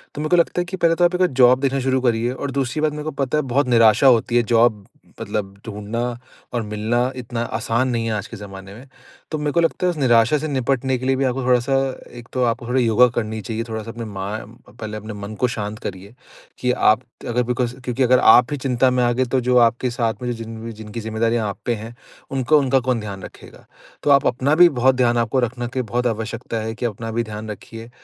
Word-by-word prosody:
तो 150 - -4
मेरे 155 - -2
को 175 - +4
लगता 175 +1 +2
है - - -3
कि 185 +2 -6
पहले 165 -2 +3
तो 175 - +3
आप 175 - +1
एक - - +6
जॉब 125 +1 +6
देखना 135 0 +1
शुरू 130 0 0
करिए 120 -1 +1
और 140 +1 -4
दूसरी 135 +2 -2
बात 155 -1 +2
मेरे 150 0 -5
को 155 - -3
पता 135 +3 -1
है - - +2
बहुत 140 -1 +2
निराशा 115 +2 +5
होती 120 -1 +3
है 120 - +4
जॉब 115 -3 +2 0.4
मतलब, 100 -2 -3
ढूँढना 105 +2 -4 0.5
और 120 - 0
मिलना 110 +4 -1
इतना 120 -2 -5
आसान 115 +2 -1
नहीं 115 -2 -1
है 115 - -1
आज 105 -3 -3
के - - -9
ज़माने 95 -1 -10
में। 125 +5 -13 0.4
तो 155 - -1
मेरे 150 0 -1
को 170 - +1
लगता 165 +2 0
है - - +3
उस 165 - -8
निराशा 120 +1 +4
से 155 +2 -3
निपटने 130 -1 0
के 130 - -6
लिए 135 - +2
भी, 135 - 0
आपको 130 0 -1
थोड़ा-सा 125 +2 +2 0.4
एक 120 - -11
तो 130 -1 +1
आपको 120 0 -1
थोड़ा 130 +1 +1
योगा 120 +2 +5
करनी 110 -1 -2
चाहिए, 110 +3 -4
थोड़ा-सा 110 0 -5
अपने 115 -1 -7
मा 95 -2 -5 0.4
पहले 110 -1 -7
अपने 110 +1 -7
मन 105 +1 -7
को 125 - +4
शांत 105 -2 -5
करिए, 100 +2 -7 0.5
कि 125 0 +1
आप 110 -2 +3 0.3
अगर 120 +1 +1
बिकॉज़ 125 0 -2
क्योंकि 125 +1 -1
अगर 125 0 +4
आप 120 +3 +6
ही 145 - -1
चिंता 130 -1 +2
में 125 -1 +1
आ 120 - +3
गए, 130 +2 +1
तो 130 +2 0
जो 125 +1 +2
आपके 120 +1 +3
साथ 120 -1 -2
में 125 0 -2
जो - - -3
जिन 115 +1 -7
जिनकी 110 +1 -8
जिम्मेदारियाँ 110 0 0
आप 100 - -7
पे 120 - +1
हैं, 115 +2 -9 0.4
उनको 135 +3 +3
उनका 135 -1 +2
कौन 125 -3 +1
ध्यान 100 -3 -7
रखेगा? - - -13 0.4
तो - - +1
आप 140 -1 +5
अपना 130 +5 +1
भी 175 0 +7
बहुत 130 -1 +2
ध्यान 120 -2 +2
आपको 115 +3 +1
रखना 120 0 -2
की 130 - +2
बहुत 120 +1 -1
आवश्यकता 115 +1 -4
है, 110 0 -3
कि 120 - -4
अपना 115 0 -4
भी 120 +1 -1
ध्यान 110 0 -7
रखिए। 115 +3 -10
120 Hz, 245 wpm, -21 LUFS, 110-130 Hz, 0.5 s, भी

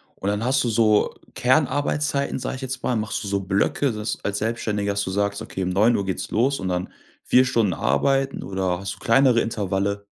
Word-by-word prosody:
Und 95 - -6
dann 105 +2 -1
hast 135 +2 +2
du 120 - 0
so 110 -2 +2 0.2
Kernarbeitszeiten, 140 +2 +1
sag 130 - -4
ich 130 - -8
jetzt 130 0 -5
mal, 125 - 0
machst 110 0 -2
du 100 - -5
so 100 0 0
Blöcke, 100 +8 0
dass 105 0 -4
als 100 0 -1
Selbstständiger, 105 -2 -1
dass 100 0 -1
du 95 - -4
sagst: 100 +1 -1
„Okay, 95 - -5
um 90 - -1
9:00 100 +2 +2
geht's 95 - -4
los 135 +5 +1
und 95 - -3
dann 90 0 -2 0.3
4 130 +1 +4
Stunden 110 -7 +1
arbeiten,“ 135 - 0
oder 95 -2 -2
hast 100 +2 -5
du - - -20
kleinere 120 0 +4
Intervalle? 100 -2 -2
105 Hz, 205 wpm, -23 LUFS, 100-130 Hz, 0.3 s, 4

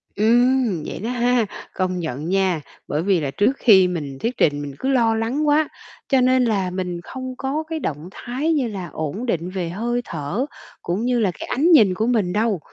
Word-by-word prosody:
Ừm, 235 - +3
vậy - - -6
đó 225 +5 -3
ha! 245 -2 +2 0.3
Công 185 -1 -1
nhận 155 0 -4
nha, 190 -4 +1 0.3
bởi 150 +2 -1
vì 190 -3 +2
là 140 -3 -2
trước 205 - +2
khi 190 -6 +6
mình 145 -6 -4
thuyết 240 +2 -2
trình 145 -1 +2
mình 140 -2 -6
cứ 265 - -1
lo 230 -4 +3
lắng 255 +7 -1
quá, 300 +1 +3 0.4
cho 265 -2 +4
nên 255 0 +4
là 200 -5 +1
mình 180 -1 -4
không 255 +5 -7
có 285 +4 -2
cái 320 -1 -2
động 155 - -4
thái 270 +10 -2
như 270 -6 +1
là 190 -5 -5
ổn 160 - -4
định 180 -6 -1
về 180 -3 -3
hơi 240 +6 -2
thở, 170 - -3 0.4
cũng 195 +7 -2
như 245 -1 +1
là 200 -5 +2
cái - - -6
ánh 315 +7 +2
nhìn 215 - +6
của 220 +5 -1
mình 205 -7 +1
đâu. 210 -4 +1
215 Hz, 210 wpm, -22 LUFS, 180-250 Hz, 0.4 s, khi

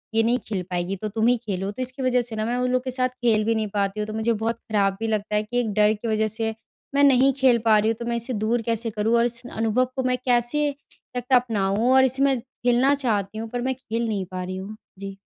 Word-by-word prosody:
ये 225 - +4
नहीं 240 +2 +2
खेल 195 -4 -2
पाएगी 175 +2 -1
तो 215 - -2
तुम 220 +2 0
ही 245 - +5
खेलो 195 -2 -2
तो 235 +5 -7
इसकी 255 +1 -5
वजह 250 -1 +3
से 235 -2 -5
ना 215 - -2
मैं 240 +2 -1
उन 250 0 0
लोग 255 0 +1
के 255 - -2
साथ 255 0 0
खेल 215 -3 +3
भी 225 0 +1
नहीं 215 -1 -1
पाती 200 +1 0
हूँ। 210 - -2
तो 215 - -6
मुझे 220 +1 0
बहुत 225 +1 -1
ख़राब 200 -4 0
भी 225 - -2
लगता 215 -1 -1
है 210 - +2
कि 245 +3 -2
एक 230 -3 -1
डर 210 +1 +4
की 220 +2 -6
वजह 220 0 +1
से 220 +1 -2 0.4
मैं 285 - +4
नहीं 270 0 +5
खेल 260 -3 +4
पा 220 -1 +6
रही 215 - +1
हूँ - - -2
तो 235 - -5
मैं 235 - -1
इसे 235 +2 -3
दूर 225 +2 0
कैसे 230 0 -2
करूँ? 215 +2 +1
और 235 - +3
इस 235 0 -2
अनुभव 225 +2 +1
को 260 - -1
मैं 250 0 +1
कैसे 250 +4 +2 0.4
करके 250 +1 +1
अपनाऊँ 225 -1 +1
और 265 0 +6
इसमें 265 0 +2
खेलना 250 +2 +1
चाहती 215 -6 -1
हूँ 225 0 -5
पर 245 +1 -3
मैं 260 +1 0
खेल 235 -2 -3
नहीं 200 -4 -2
पा 185 0 -4
रही 185 +1 -5
हूँ। 195 +3 -7 0.2
जी। 195 0 -7
230 Hz, 270 wpm, -24 LUFS, 215-250 Hz, 0.4 s, पा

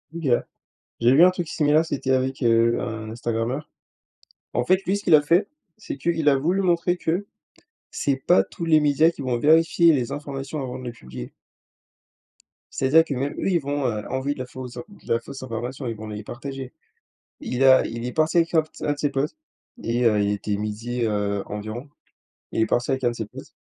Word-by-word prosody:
OK. 165 -3 -3 0.7
J'ai 120 +2 +4
vu 155 +6 +7
un 180 - +8
truc 175 -3 -4
similaire, 155 0 +2
c'était 135 -4 -2
avec, 130 +1 0
heu, 115 0 +3
un 110 -1 -5
Instagrameur. 120 +5 -3 0.8
En 125 - 0
fait, 185 +5 +3
lui, 195 +2 +1
ce 200 - -8
qu'il 165 - +6
a 150 - +6
fait, 170 +7 +2 0.3
c'est - - -7
qu'il 165 +1 -1
a 140 - +4
voulu 175 +8 +1
montrer 175 0 +1
que 175 +5 -1 0.7
c'est 140 -2 0
pas 155 +7 +4
tous 170 - -7
les 160 -2 +5
médias 150 +3 +4
qui 155 - -8
vont 125 -2 -1
vérifier 165 +4 +5
les 130 -3 -1
informations 140 0 -5
avant 125 -1 -5
de 130 - -9
les 120 - -4
publier 65 - -9 1.5
c'est-à-dire 145 +5 +5
que, 155 - -4
même 135 +2 -2
eux, - - -2
ils 175 - +3
vont, 145 -1 -2
heu, 105 -3 -2
envoyer 130 +2 -1
de - - -13
la 130 - -3
fausses 125 -1 -9
in - - -5
de 200 - -4
la 115 - +2
fausse 130 +3 -9
information, 125 +2 -5
ils 115 - -3
vont 110 - -8
les 105 0 -6
partager. 135 +2 -7 0.7
Il 125 +2 -1
a 130 -1 +6
il 115 +1 -6
est 125 - -4
parti 160 +2 +1
avec 165 0 +2
un 160 - +5 0.2
un 145 - +1
de 145 - -6
ses 145 - +1
potes 140 +1 -1 0.5
et 120 +2 0
heu, 105 -3 +4
il 100 0 +1
était 105 0 -2
midi, 110 +4 -3
heu, 105 -2 -1
environ. 110 +6 -6 0.6
Il 110 - +1
est - - +3
parti 120 +3 0
avec 130 -1 -1
un 120 - +4
de - - -6
ses 110 - -4
potes - - -12
130 Hz, 215 wpm, -24 LUFS, 115-155 Hz, 1.5 s, un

